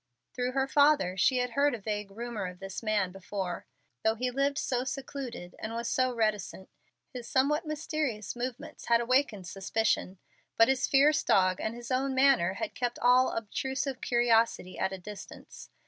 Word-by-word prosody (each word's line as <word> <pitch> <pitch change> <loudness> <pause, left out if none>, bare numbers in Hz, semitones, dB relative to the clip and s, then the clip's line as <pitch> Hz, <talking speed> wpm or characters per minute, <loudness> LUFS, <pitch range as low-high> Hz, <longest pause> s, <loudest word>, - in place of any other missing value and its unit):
Through 250 0 -2
her 270 0 +1
father 285 -10 +4
she 255 +7 +3
had 250 0 0
heard 280 +2 +2
a - - -8
vague 210 0 -4
rumor 225 -1 -5
of 180 0 -9
this 195 0 -6
man 210 -4 0
before. 190 -1 -5 0.4
Though 220 0 +2
he 250 +2 -2
lived 275 +2 0
so 250 -4 -1
secluded 260 -8 -6
and 220 - -5
was 235 0 -3
so 255 +1 +1
reticent, 215 -5 -2 0.4
his 245 -2 -7
somewhat 300 +5 +1
mysterious 305 -9 -3
movements 245 0 -6
had 235 0 +4
awakened 240 -5 +1
suspicion. 195 +1 -1 0.4
But 225 +2 +6
his 265 -1 +2
fierce 290 +2 +4
dog 185 -1 +3
and 220 +1 -2
his 240 +1 -8
own 265 +1 0
manner 260 -10 +4
had - - -4
kept 245 -1 -2
all 250 +1 +4
obtrusive 265 +4 -3
curiosity 230 -6 +2
at 190 - 0
a 190 - -5
distance. 195 +1 -11
240 Hz, 170 wpm, -29 LUFS, 205-265 Hz, 0.4 s, But